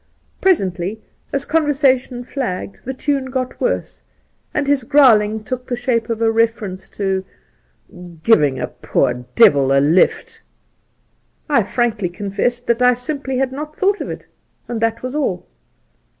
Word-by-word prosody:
Presently, 195 Hz, -, +1 dB, 0.3 s
as 280 Hz, 0 st, -1 dB
conver 300 Hz, -2 st, +1 dB
sation 255 Hz, -3 st, +1 dB
flagged, 215 Hz, -8 st, -5 dB
the 265 Hz, -, -3 dB
tune 275 Hz, 0 st, -1 dB
got 260 Hz, -1 st, -4 dB
worse -, -, -2 dB, 0.5 s
and 295 Hz, -, -1 dB
his 280 Hz, -2 st, +2 dB
growling 220 Hz, -6 st, +4 dB
took 250 Hz, +3 st, -5 dB
the 245 Hz, -, -1 dB
shape 240 Hz, -2 st, -1 dB
of 230 Hz, 0 st, -1 dB
a 225 Hz, -, +3 dB
reference 220 Hz, -4 st, -1 dB
to 190 Hz, -2 st, 0 dB, 1.0 s
'giving 150 Hz, -12 st, +4 dB
a -, -, -1 dB
poor -, -, 0 dB, 0.2 s
devU 140 Hz, -, +5 dB
a 135 Hz, -, +5 dB
lift.' 185 Hz, -, +2 dB
Soltke -, -, -44 dB
39 280 Hz, -6 st, +4 dB
I -, -, -1 dB
frankly 220 Hz, -4 st, -1 dB
confessed 205 Hz, +6 st, -2 dB
that 235 Hz, +1 st, +1 dB
I 250 Hz, 0 st, +5 dB
simply 265 Hz, +1 st, -3 dB
had 265 Hz, 0 st, 0 dB
not 300 Hz, +3 st, -7 dB
thought 400 Hz, +1 st, +1 dB
of -, -, -4 dB
it, -, -, -7 dB, 0.4 s
and 235 Hz, -2 st, -4 dB
that 230 Hz, +1 st, 0 dB
was 255 Hz, +1 st, -4 dB
all. 300 Hz, -, -1 dB
240 Hz, 155 wpm, -19 LUFS, 210-270 Hz, 1.0 s, devU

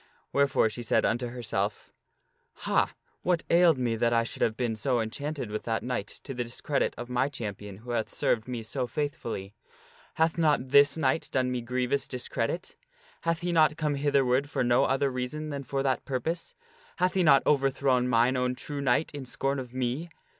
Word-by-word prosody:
Wherefore 140 Hz, -4 st, +3 dB
she 110 Hz, +2 st, -5 dB
said 115 Hz, -, +2 dB
unto 120 Hz, +2 st, 0 dB
herself: 115 Hz, -4 st, -3 dB, 0.3 s
" -, -, -45 dB
Hah! -, -, +3 dB, 0.3 s
what 175 Hz, -2 st, +1 dB
ailed 170 Hz, -3 st, +6 dB
me 120 Hz, -3 st, 0 dB
that 115 Hz, +1 st, +2 dB
I 115 Hz, 0 st, +3 dB
should 115 Hz, -, -7 dB
have 110 Hz, -1 st, +1 dB
been 120 Hz, -3 st, -1 dB
so 120 Hz, +3 st, 0 dB
enchanted 130 Hz, +2 st, -4 dB
with 110 Hz, -, -2 dB
that 115 Hz, -1 st, -1 dB
knight 120 Hz, -5 st, -2 dB, 0.2 s
to 135 Hz, -, -6 dB
the 125 Hz, -1 st, -2 dB
discredit 120 Hz, +4 st, -1 dB
of 120 Hz, -, -6 dB
my 125 Hz, +2 st, +1 dB
champion 105 Hz, -6 st, -6 dB
who 120 Hz, +4 st, -8 dB
hath 115 Hz, -2 st, -1 dB
served 110 Hz, 0 st, 0 dB
me 120 Hz, -3 st, -4 dB
so 125 Hz, +3 st, -3 dB
faithfully? 120 Hz, -9 st, -4 dB, 0.6 s
Hath 160 Hz, +1 st, +1 dB
not 150 Hz, -5 st, +2 dB
this 140 Hz, +2 st, +6 dB
knight 140 Hz, 0 st, +1 dB
done 130 Hz, -1 st, +1 dB
me 125 Hz, -1 st, -2 dB
grievous 125 Hz, +3 st, -1 dB
discredit? 125 Hz, +6 st, -3 dB, 0.5 s
Hath 165 Hz, 0 st, 0 dB
he 175 Hz, 0 st, -1 dB
not 155 Hz, -3 st, +4 dB
come 150 Hz, -2 st, 0 dB
hitherward 140 Hz, -1 st, +2 dB
for -, -, 0 dB
no 120 Hz, 0 st, +4 dB
other 135 Hz, +1 st, +1 dB
reason 130 Hz, +5 st, -4 dB
than 140 Hz, -1 st, -4 dB
for 135 Hz, +1 st, -2 dB
that 135 Hz, -1 st, 0 dB
purpose? 160 Hz, +6 st, -3 dB, 0.4 s
Hath 180 Hz, +1 st, +1 dB
he 190 Hz, -, +2 dB
not 140 Hz, -5 st, +6 dB
overthrown 135 Hz, -3 st, +2 dB
mine 120 Hz, +1 st, +3 dB
own 125 Hz, 0 st, 0 dB
true 145 Hz, +2 st, -5 dB
knight 140 Hz, +3 st, +2 dB
in 145 Hz, -2 st, -5 dB
scorn 135 Hz, +2 st, -2 dB
of 125 Hz, -2 st, -7 dB
me 130 Hz, +6 st, -2 dB
130 Hz, 190 wpm, -28 LUFS, 120-145 Hz, 0.6 s, ailed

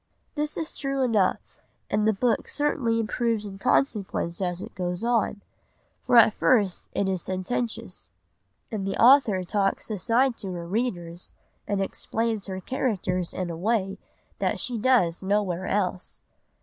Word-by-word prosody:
This 300 Hz, 0 st, -2 dB
is 320 Hz, -, -3 dB
true 275 Hz, -1 st, -1 dB
enough, 215 Hz, -7 st, 0 dB, 0.3 s
and 210 Hz, +1 st, +1 dB
the -, -, +5 dB
book 230 Hz, +3 st, 0 dB
certainly 260 Hz, -6 st, 0 dB
improves 225 Hz, -1 st, 0 dB
in 195 Hz, -1 st, -8 dB
consequence 195 Hz, -8 st, 0 dB
as 180 Hz, -1 st, -1 dB
it -, -, -7 dB
goes 180 Hz, +1 st, -3 dB
on, 230 Hz, -3 st, 0 dB, 0.6 s
for 245 Hz, -, +3 dB
at 220 Hz, -2 st, +8 dB
first 205 Hz, -8 st, +2 dB
it 200 Hz, -, 0 dB
is 190 Hz, -2 st, -1 dB
sententious, 185 Hz, -, -3 dB, 0.6 s
and 200 Hz, -3 st, -3 dB
the 195 Hz, -, -3 dB
author 235 Hz, -7 st, +6 dB
talks 195 Hz, +3 st, -1 dB
aside 230 Hz, +6 st, +2 dB
to 190 Hz, -3 st, -5 dB
her 170 Hz, -1 st, -5 dB
readers 175 Hz, -5 st, -3 dB, 0.3 s
and 205 Hz, -1 st, 0 dB
explains 220 Hz, +1 st, -2 dB
her 190 Hz, -1 st, -4 dB
characters 185 Hz, -7 st, -1 dB
in 180 Hz, -2 st, -3 dB
a -, -, -5 dB
way 195 Hz, +1 st, 0 dB, 0.4 s
that -, -, 0 dB
she 250 Hz, -, -1 dB
does 210 Hz, -9 st, +3 dB
nowhere 190 Hz, -2 st, 0 dB
else. 185 Hz, -2 st, -2 dB
205 Hz, 150 wpm, -26 LUFS, 185-235 Hz, 0.6 s, at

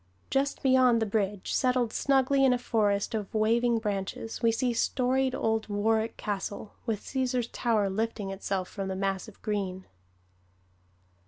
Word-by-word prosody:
Just 275 Hz, +1 st, 0 dB
beyond 255 Hz, -3 st, +5 dB
the 225 Hz, -, +1 dB
bridge, 200 Hz, -2 st, -1 dB
settled 250 Hz, -3 st, +1 dB
snugly 270 Hz, 0 st, +3 dB
in 260 Hz, -2 st, +5 dB
a -, -, +1 dB
forest 210 Hz, -5 st, 0 dB
of 210 Hz, -3 st, -3 dB
waving 230 Hz, +2 st, +3 dB
branches, 210 Hz, 0 st, -3 dB
we 230 Hz, -1 st, +4 dB
see 240 Hz, +2 st, 0 dB
storied 260 Hz, +2 st, +1 dB
old 220 Hz, -2 st, 0 dB
Warwick 220 Hz, +2 st, 0 dB
Castle, 205 Hz, 0 st, -4 dB
with 220 Hz, -3 st, -1 dB
Cæsar's 255 Hz, -3 st, -1 dB
Tower 220 Hz, -4 st, +1 dB
lifting 210 Hz, 0 st, -2 dB
itself 195 Hz, -1 st, -3 dB
from 195 Hz, -1 st, -5 dB
the 190 Hz, -, -3 dB
mass 195 Hz, -1 st, -2 dB
of -, -, -14 dB
green. 190 Hz, -3 st, -2 dB
225 Hz, 150 wpm, -28 LUFS, 200-250 Hz, -, beyond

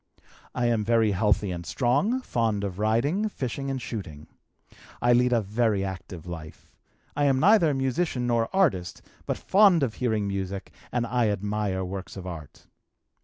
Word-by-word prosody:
"I 125 Hz, -, 0 dB
am 115 Hz, -2 st, +2 dB
very 115 Hz, -1 st, +3 dB
healthy 100 Hz, 0 st, +1 dB
and 85 Hz, -1 st, -5 dB
strong, 145 Hz, -, +1 dB
fond 115 Hz, -, -1 dB
of 95 Hz, -1 st, -4 dB
riding, 140 Hz, -, +1 dB
fishing, 135 Hz, -, -4 dB
and 135 Hz, -1 st, -2 dB
shooting. 90 Hz, -12 st, -7 dB, 0.7 s
I 120 Hz, 0 st, +4 dB
lead 125 Hz, +1 st, +3 dB
a 120 Hz, -2 st, +3 dB
very 105 Hz, -1 st, 0 dB
active 90 Hz, -3 st, -7 dB
life. 80 Hz, -3 st, -9 dB, 0.4 s
I 145 Hz, 0 st, +1 dB
am 135 Hz, -2 st, +3 dB
neither 185 Hz, -1 st, +5 dB
musician 135 Hz, 0 st, -1 dB
nor 115 Hz, -2 st, +1 dB
artist, 125 Hz, -, 0 dB, 0.2 s
but -, -, -1 dB
fond 195 Hz, -6 st, +4 dB
of 120 Hz, -5 st, 0 dB
hearing 110 Hz, -5 st, -1 dB
music 95 Hz, 0 st, -4 dB, 0.2 s
and 120 Hz, -1 st, 0 dB
I 120 Hz, -1 st, +1 dB
admire 105 Hz, -2 st, -2 dB
works 95 Hz, +1 st, -7 dB
of 95 Hz, -, -7 dB
art. 80 Hz, -6 st, -9 dB
115 Hz, 160 wpm, -26 LUFS, 95-130 Hz, 0.7 s, neither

